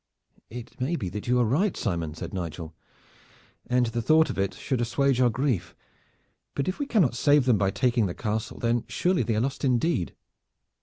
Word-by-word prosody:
"It 120 Hz, +1 st, -9 dB
may 145 Hz, +7 st, 0 dB
be 95 Hz, -, -3 dB
that 105 Hz, +5 st, -6 dB
you 125 Hz, +1 st, +3 dB
are 120 Hz, -, +3 dB
right, 165 Hz, -, +1 dB
Simon," 85 Hz, -7 st, -2 dB
said 85 Hz, +1 st, -7 dB
Nigel, 85 Hz, -3 st, -5 dB, 0.9 s
"and 125 Hz, 0 st, +2 dB
the 120 Hz, 0 st, -2 dB
thought 160 Hz, +5 st, +4 dB
of -, -, -5 dB
it 95 Hz, 0 st, 0 dB
should 130 Hz, -4 st, -2 dB
assuage 130 Hz, +2 st, +1 dB
our 125 Hz, -, +5 dB
grief. 120 Hz, -, -1 dB, 0.8 s
But 140 Hz, -, -1 dB
if 185 Hz, -, -2 dB
we 285 Hz, -, -2 dB
cannot 185 Hz, -, +3 dB
save 145 Hz, +3 st, +3 dB
them 120 Hz, -6 st, +3 dB
by 100 Hz, -2 st, +2 dB
taking 115 Hz, +2 st, +1 dB
the 85 Hz, -, -5 dB
castle, 110 Hz, -1 st, -3 dB
then 120 Hz, 0 st, 0 dB
surely 180 Hz, 0 st, +1 dB
they 115 Hz, -, 0 dB
are 110 Hz, -, +1 dB
lost 135 Hz, +3 st, -3 dB
indeed." 130 Hz, -, +1 dB
120 Hz, 195 wpm, -26 LUFS, 105-140 Hz, 0.9 s, our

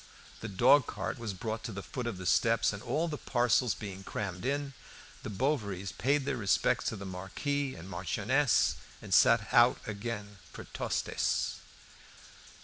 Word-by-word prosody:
The 115 Hz, -, -5 dB
dog 125 Hz, +8 st, +5 dB
cart -, -, -4 dB
was 110 Hz, -4 st, -4 dB
brought 110 Hz, +3 st, -4 dB
to -, -, -4 dB
the 100 Hz, -1 st, -6 dB
foot 125 Hz, -3 st, -5 dB
of 110 Hz, -5 st, -3 dB
the 95 Hz, -, -7 dB
steps, 115 Hz, +4 st, +3 dB
and, 100 Hz, -, -7 dB
all 145 Hz, +8 st, -1 dB
the 150 Hz, -3 st, -4 dB
parcels 120 Hz, -1 st, +2 dB
being 95 Hz, -2 st, -7 dB
crammed 95 Hz, -1 st, -4 dB
in, 140 Hz, 0 st, -2 dB, 0.5 s
the -, -, -6 dB
Bovarys 100 Hz, -5 st, -1 dB
paid 140 Hz, +2 st, +1 dB
their -, -, -1 dB
respects 105 Hz, -4 st, +1 dB
to -, -, -1 dB
the 100 Hz, -1 st, -7 dB
Marquis 130 Hz, +10 st, -3 dB
and 85 Hz, -, -10 dB
Marchioness 105 Hz, +7 st, +1 dB, 0.2 s
and -, -, -5 dB
set 115 Hz, -2 st, +5 dB
out 120 Hz, +1 st, +6 dB
again 105 Hz, -1 st, -5 dB
for -, -, -9 dB
Tostes. -, -, -1 dB
110 Hz, 160 wpm, -31 LUFS, 100-130 Hz, 0.5 s, out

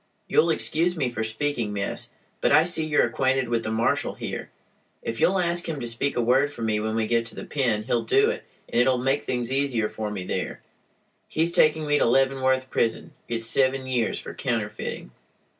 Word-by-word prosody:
"You'll 455 Hz, -, +3 dB
excuse 170 Hz, +3 st, +1 dB
me 130 Hz, -5 st, 0 dB
for 110 Hz, -2 st, -3 dB
speaking, 115 Hz, 0 st, -1 dB
miss, 100 Hz, 0 st, -1 dB, 0.3 s
but, -, -, +2 dB
I 155 Hz, -, +7 dB
see 165 Hz, -2 st, 0 dB
you're 150 Hz, -, +3 dB
acquainted 130 Hz, +1 st, 0 dB
with 115 Hz, -1 st, +1 dB
the 110 Hz, -, -3 dB
marshall 110 Hz, +1 st, 0 dB
here. -, -, -5 dB, 0.5 s
If 115 Hz, -, -4 dB
you'll 190 Hz, -, +4 dB
ask 175 Hz, -1 st, 0 dB
him 155 Hz, -3 st, -3 dB
to 120 Hz, -, -4 dB
speak 120 Hz, +4 st, -1 dB
a -, -, +3 dB
word 130 Hz, +5 st, +3 dB
for 120 Hz, -, -7 dB
me 110 Hz, -1 st, +1 dB
when 110 Hz, +1 st, -2 dB
we 115 Hz, -1 st, +1 dB
get 115 Hz, +1 st, +1 dB
to -, -, -9 dB
the -, -, -7 dB
pen 120 Hz, -7 st, 0 dB
he'll 120 Hz, 0 st, 0 dB
do 415 Hz, +3 st, +3 dB
it, -, -, -6 dB, 0.2 s
and 120 Hz, -, +2 dB
it'll 130 Hz, +1 st, +3 dB
make 135 Hz, +3 st, 0 dB
things 125 Hz, -1 st, -2 dB
easier 135 Hz, -5 st, +1 dB
for 110 Hz, -1 st, -4 dB
me 100 Hz, -3 st, -4 dB
there. -, -, -3 dB, 0.7 s
He's 165 Hz, +2 st, +1 dB
taking 155 Hz, -2 st, +3 dB
me 145 Hz, 0 st, +2 dB
to -, -, +3 dB
Leavenworth 130 Hz, +1 st, +2 dB
prison. 115 Hz, -, -1 dB
It's 115 Hz, -1 st, -1 dB
seven 130 Hz, +2 st, +2 dB
years 125 Hz, -3 st, 0 dB
for -, -, -7 dB
counterfeiting." 60 Hz, -, -3 dB
130 Hz, 205 wpm, -25 LUFS, 115-145 Hz, 0.7 s, I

